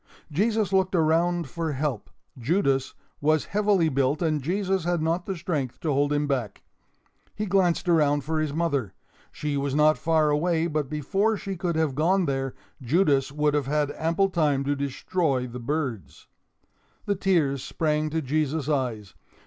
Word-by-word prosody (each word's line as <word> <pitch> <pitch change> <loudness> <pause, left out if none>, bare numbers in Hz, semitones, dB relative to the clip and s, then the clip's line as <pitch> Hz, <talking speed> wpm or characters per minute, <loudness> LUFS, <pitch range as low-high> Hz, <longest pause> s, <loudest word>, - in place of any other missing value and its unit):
Jesus 210 +3 +1
looked 190 0 +2
around 170 +1 +2
for 165 -3 -3
help. 135 -5 -3 0.3
Judas 135 - 0 0.3
was 155 +1 +2
heavily 205 -5 +3
built 140 0 +1
and 155 -3 0
Jesus 190 +4 -1
had 175 0 0
not 165 +3 -1
the 195 - -2
strength 155 -7 -3
to 155 -3 0
hold 145 +1 +1
him 145 0 +1
back. 125 -8 -3 0.7
He 210 - -2
glanced 185 -2 +1
around 145 -4 +3
for 160 +1 -1
his 155 -2 -1
mother. 140 - -1 0.4
She 150 -1 -3
was 140 0 -1
not 155 +1 +4
far 160 -2 +2
away, 165 +2 +1
but 155 -4 -2
before 195 +9 0
she 195 -1 -5
could 175 -1 -2
have 160 -3 +1
gone 175 +6 +2
there, 135 -2 -2 0.3
Judas 140 0 +2
would 150 0 +1
have 145 -3 0
had 145 0 0
ample 170 +5 +1
time 150 -6 +1
to 145 +1 0
destroy 140 0 -1
the 125 0 -7
birds. 130 - -4 0.8
The 205 - +1
tears 165 -9 +1
sprang 155 -1 -1
to 160 +1 -2
Jesus' 150 +1 -1
eyes. 120 -9 -2
155 Hz, 165 wpm, -26 LUFS, 140-175 Hz, 0.8 s, not